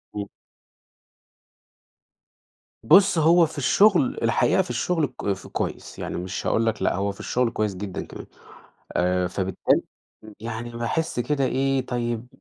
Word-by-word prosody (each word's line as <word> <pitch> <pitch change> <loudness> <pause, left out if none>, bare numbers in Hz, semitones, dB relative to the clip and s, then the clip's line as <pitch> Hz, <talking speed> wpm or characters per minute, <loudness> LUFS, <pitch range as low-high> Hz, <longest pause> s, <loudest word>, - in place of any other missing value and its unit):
إمم. 100 -1 -4 2.6
بُص 190 - +6
هو 165 +2 +5
في 160 0 -9
الشغل، 170 +3 +3
الحقيقة - - +3
في - - -6
الشغل 150 +6 0
ك 100 - -3
ف 95 - -10
كويس، - - -5
يعني - - -4
مش 90 +2 -4
هاقول 115 - +2
لَك 115 - -1
لأ - - +1
هو 100 +2 -1
في 100 - -15
الشغل 125 -1 0
كويس 105 -4 -1
جدًا 95 0 -5
كمان، - - -10 0.7
آآ 90 +1 +1
فبالتالي 95 +1 0 0.6
يعني 115 +1 -5
باحس 120 +5 -2
كده 140 +2 0
إيه 135 0 0
طيب، 120 -1 -3
120 Hz, 140 wpm, -24 LUFS, 100-145 Hz, 2.6 s, بُص